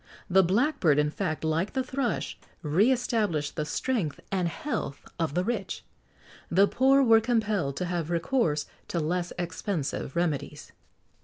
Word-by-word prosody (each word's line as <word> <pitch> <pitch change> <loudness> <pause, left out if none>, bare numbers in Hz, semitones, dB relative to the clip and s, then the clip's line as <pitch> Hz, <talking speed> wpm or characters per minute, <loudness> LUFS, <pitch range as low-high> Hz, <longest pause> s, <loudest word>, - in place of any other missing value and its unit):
The 190 +1 +5
blackbird, 190 - +2
in 150 0 +2
fact, 155 +1 -3
like 160 +5 0
the 265 - 0
thrush, 255 -2 -2 0.3
re 180 - +3
established 210 - 0
the 150 - -1
strength 190 - -1
and 185 -3 +1
health 170 - -4
of 160 -3 -1
the 180 - +2
rich.[XX 215 -2 -3 0.7
59] 170 - -3
The 200 +1 +7
poor 270 +4 +4
were 225 -2 +6
compelled 215 - 0
to 180 - -1
have 170 -2 -2
recourse 170 - +1 0.2
to 170 - -2
less 175 +3 -1
expensive 175 -5 -3
remedies. 150 -3 -2
180 Hz, 150 wpm, -28 LUFS, 155-230 Hz, 0.7 s, The